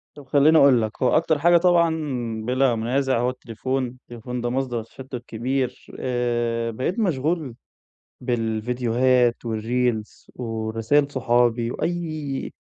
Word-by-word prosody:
طَب 145 - -12
خلّيني 145 +3 +5
أقول 135 -5 +6
لك، 110 0 -4
هو 125 - +4
أكتر 160 -2 +1
حاجة 175 +2 +5
طبعًا 170 -1 +4 0.6
بلا 130 0 +2
منازع 130 +3 0
هو 125 +1 +1
التليفون. 130 +1 -3
التليفون 125 0 -8
ده 120 - -1
مصدر 125 -3 -2
تشتت 125 +1 -9
كبير. 125 +3 -3
آآ 120 -2 -1
بقيت 130 - -2
مشغول 155 - -1 0.7
بالفيديوهات 120 +1 +1
والReels 115 0 -2
ورسايل 115 +5 0
صحابي، 120 -2 +2
وأي 155 -5 -3
125 Hz, 120 wpm, -23 LUFS, 115-140 Hz, 0.7 s, أقول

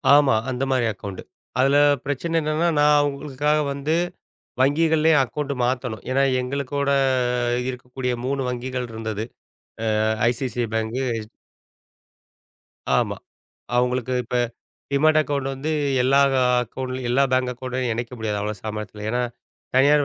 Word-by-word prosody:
ஆமா. 145 -3 +5 0.2
அந்த 130 +1 -2
மாரி 125 -3 +2
அக்கவுண்ட். 100 -1 -7 0.4
அதுல 135 +2 +4 0.3
பிரச்சனை 145 +4 -2
என்னன்னா, 155 +3 +1
நான் 150 0 +5
உங்களுக்காக 145 +2 -1
வந்து 145 +3 -1 0.7
வங்கிகள்லேயே 160 +2 +4
அக்கவுண்ட் 145 +3 -4
மாத்தணும். 125 -4 -2
ஏன்னா, 135 +1 +3 0.2
எங்களுக்கூட 140 +2 -2 0.6
ஆ, - - +2
இருக்கக்கூடிய 125 0 -4
3 135 +1 -1
வங்கிகள் 125 0 -3
இருந்தது 110 -1 -4 0.8
ஆ, - - +2 0.3
ஐசிஐசிஐ 120 -1 -2
பேங்க், 110 +2 -1 0.2
எச் 110 0 -8 1.7
ஆமா. - - 0 0.6
அவங்களுக்கு 125 0 +1
இப்ப 125 - -2 0.6
டீமேட் 155 +2 +4
அக்கவுண்ட் 140 -2 -1
வந்து 145 +4 -3 0.3
எல்லா 135 +2 +4 0.4
அக்கவுண்ட்லயும் 130 +1 -5
எல்லா 135 +3 +3
பேங்க் 130 -1 +2
அக்கவுண்ட்லயும் 125 -1 -3
இணைக்க 120 +2 -4
முடியாது. 105 -2 -2
அவ்வளோ 105 +1 -2
சாமத்தியத்துல. 105 -1 -6
ஏன்னா, 125 +1 0 0.5
தனியார் 145 +2 +5
130 Hz, 125 wpm, -23 LUFS, 120-145 Hz, 1.7 s, ஆமா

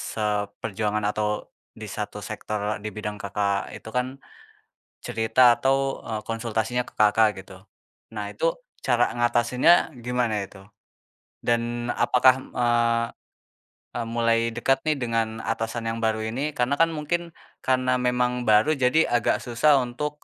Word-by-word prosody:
seperjuangan 105 0 -2
atau 105 0 -1 0.3
di - - -7
satu - - -5
sektor 105 0 -4
di - - -3
bidang 105 -1 -4
Kakak 100 0 -1
itu - - -11
kan 125 +2 0 1.0
cerita 120 +2 +4
atau, 135 0 +1
eee, 110 -2 -3
konsultasinya 115 +1 -1
ke - - -14
Kakak 105 +1 +5
gitu. 95 0 -12 0.6
Nah - - -4
itu - - -3 0.4
cara 120 -1 +2
ngatasinnya 120 +3 +3 0.3
gimana 125 -2 0
itu? 95 - -15 0.9
Dan 120 0 0
apakah, 125 0 +5 0.2
eee, 120 -1 +2
mmm, - - -33 0.9
mulai 115 0 +2
dekat 135 0 +2
nih 155 - +2
dengan 115 -3 -1
atasan 115 +1 -2
yang 115 0 -3
baru 110 -1 0
ini? 135 +7 -3
Karena 125 +2 +1
kan 165 - +6
mungkin 170 +3 -2 0.3
karena 130 0 +1
memang 125 0 +1
baru 110 +7 +5
jadi 135 +3 +3
agak 120 -2 +2
susah 135 +4 +3
untuk, 150 +5 -5
120 Hz, 135 wpm, -25 LUFS, 110-125 Hz, 1.0 s, kan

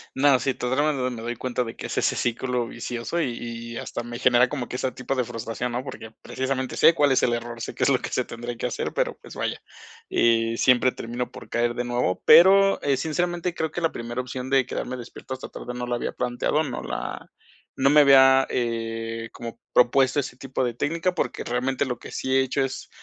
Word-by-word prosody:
No, 135 0 +5
sí, 130 +2 0
to 125 - -3
drama 145 +4 +2 0.2
me 120 -3 -6
doy 120 +1 -4
cuenta 125 0 -1
de 115 -1 -8
que - - -7
es - - -5
ese - - +1
círculo 120 0 -1
vicioso 120 +8 -3
y 130 - -1 0.4
y 115 - -6
hasta 120 - -5
me 120 0 -7
genera 125 0 +4
como 135 -4 -4
que - - -6
esa 130 0 -2
tipo 125 +2 -3
de 130 - +1
frustración, 115 +1 -4
¿no? 125 +2 -3
Porque, 115 -4 -8
precisamente 130 -1 -3
sé 165 - +6
cuál 145 -4 +3
es - - +2
el 120 - +3
error, 120 0 -4
sé - - -5
que - - -2
es - - +4
lo - - +4
que - - -5
se - - -1
tendría 120 0 -6
que - - -4
hacer, - - -3
pero - - -1
pues - - -12
vaya, - - -2 0.5
eh, 115 -1 +2
siempre 125 0 +4
termino 120 +1 -5
por - - -11
caer 120 0 0
de 120 - -2
nuevo, 120 -6 -1
pero, 195 +2 +7
eh, 140 -2 +2
sinceramente, 175 +4 -1
creo 160 -2 -2
que 175 - -4
la 165 -1 0
primera 120 +1 -5
opción 130 0 -5
de 135 -1 +3
quedarme 130 +2 -4
despierto 125 +2 -8
hasta 130 - -8
tarde 125 - -7
no 125 0 -4
la 120 - 0
había 120 - -3
planteado, 125 +5 0
no 130 -6 -4
la - - -5 0.5
no 135 +1 +4
me 150 +1 +7
había, 135 -1 +7
eh, 115 -1 -3
como 115 -2 -8
propuesto 130 +2 +4
ese 140 - -4
tipo 130 -1 -3
de 120 - -2
técnica, 165 +8 -1
porque - - -2
realmente 130 +3 0
lo 125 -3 -4
que - - -10
sí 130 0 -1
he 135 - +5
hecho 130 +1 0
es, 135 - -7
125 Hz, 230 wpm, -25 LUFS, 120-135 Hz, 0.5 s, pero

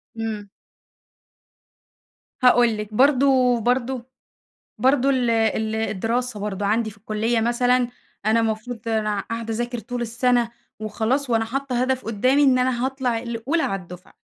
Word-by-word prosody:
امم. 220 -2 -4 2.0
هاقول 240 -3 +5
لِك، 210 0 -6
برضه 260 -1 +4
برضه 245 +1 -1 0.7
برضه 270 +1 +3
ال 250 -3 +1
ال 220 -1 +1
الدراسة 225 +2 -2
برضه 205 -1 -3
عَندي 220 +2 +1
في 215 - -15
الكُلّية 220 +3 -1
مثلًا، 245 +1 +2 0.4
أنا 220 +1 +4
المفروض 225 +1 -3
أنا 215 -2 0
قاعدة 230 -1 -3
أذاكر 240 +1 -3
طول 245 +2 -5
السَّنة 240 0 +1 0.3
وخلاص، 235 +5 -1
وأنا 225 -1 +2
حاطّة 255 +1 -2
هدَف 260 0 -1
قُدّامي 255 +6 +2
إن 260 -2 +4
أنا 250 -1 +1
هاطلَع 260 -3 -1
الأولى 235 +7 -2
على 195 - -2
الدُّفعة، 180 +1 -13
235 Hz, 135 wpm, -23 LUFS, 220-250 Hz, 2.0 s, هاقول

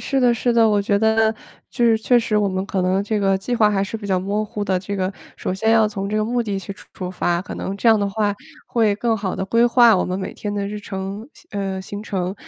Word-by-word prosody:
是 275 - -1
的， 245 -2 +4
是 240 +1 0
的。 230 -1 +5
我 205 -1 +2
觉 200 0 +1
得 220 0 +3 0.4
就 240 - 0
是 225 -1 +5
确 240 +2 +3
实 225 -2 0
我 205 -1 +2
们 190 0 -2
可 190 -2 -1
能 185 +2 +1
这 210 0 -1
个 195 -1 +2
计 245 +6 -3
划 215 -3 +4
还 195 -1 +1
是 225 - -5
比 215 - -11
较 190 -2 +1
模 200 +3 -1
糊 210 0 -4
的， 190 -2 +1
这 200 +2 -5
个 190 +1 -1 0.2
首 185 - -3
先 220 +4 +1
要 225 -1 +5
从 200 -1 -4
这 215 - -1
个 215 - +1
目 240 +2 0
的 205 -3 -3
去 195 +1 -7
出 - - -17
出 180 -1 -5
发， 175 -1 0
可 185 - -7
能 195 - -4
这 230 - +2
样 220 -1 +6
的 200 0 0
话 205 0 0 0.3
会 220 -4 +2
更 230 +1 0
好 200 -3 -3
地 - - -2
规 230 +4 +3
划 235 -3 +6
我 - - +1
们 185 +1 -3
每 190 - -5
天 205 - -4
的 200 -1 -2
日 210 +1 -5
程， 195 +3 -6
行 345 - -20
呃， 190 -1 -3
行 205 +2 -7
程。 190 -3 -3
205 Hz, 305 characters per minute, -21 LUFS, 195-225 Hz, 0.4 s, 样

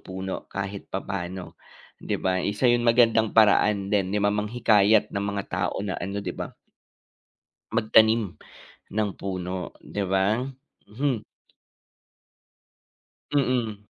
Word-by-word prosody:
puno 95 0 -6
kahit 100 0 -5
papaano, 95 -1 -5 0.5
'di - - -2
ba. 95 -1 0
Isa 105 +6 -2
'yon 120 -1 +5
magandang 115 -2 +4
paraan 105 -2 +4
din 100 -3 +2
ni 100 - -1
ma 105 0 +2
manghikayat 105 -1 +3
ng 100 0 -2
mga 100 - -1
tao - - -1
na 95 -3 -2
ano, 100 +3 -4
'di - - -3
ba? - - -6 1.2
Magtanim 110 -3 +4 0.6
ng 110 -1 +1
puno 90 -1 -4
'di 100 - -3
ba? 95 +4 +2 0.5
Mhm. 125 0 -1 2.1
Mm. 120 -7 0
105 Hz, 115 wpm, -25 LUFS, 95-110 Hz, 2.1 s, yon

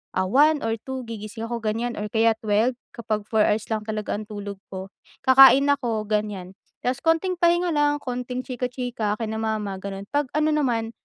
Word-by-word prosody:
ah, 185 0 +1
1 295 +7 +4
or 225 0 0
2 265 -1 -5
gigising 220 0 -7
ako 235 0 -3
ganyan 230 +2 -1
or 210 - -3
kaya 225 0 +3
12 220 +4 +2 0.2
kapag 215 -2 -2
4 220 -1 +4
hours 215 +1 +1
lang 215 -1 -1
talaga 215 -1 -2
ang 215 - -8
tulog 200 -2 -7
ko, 190 +1 -7 0.3
kakain 270 +1 +8
ako 230 -6 -1
ganyan 205 -3 -2 0.3
tapos 255 +4 -1
konting 330 +3 +2
pahinga 345 0 +3
lang 290 0 +2
konting 250 0 -4
chika-chika 245 -4 -3
kina 220 0 -4
mama 215 -3 -2
gano'n. 195 0 -6
Pag 290 -2 +1
ano 305 0 +2
naman, 240 -7 0
225 Hz, 180 wpm, -24 LUFS, 210-265 Hz, 0.3 s, kakain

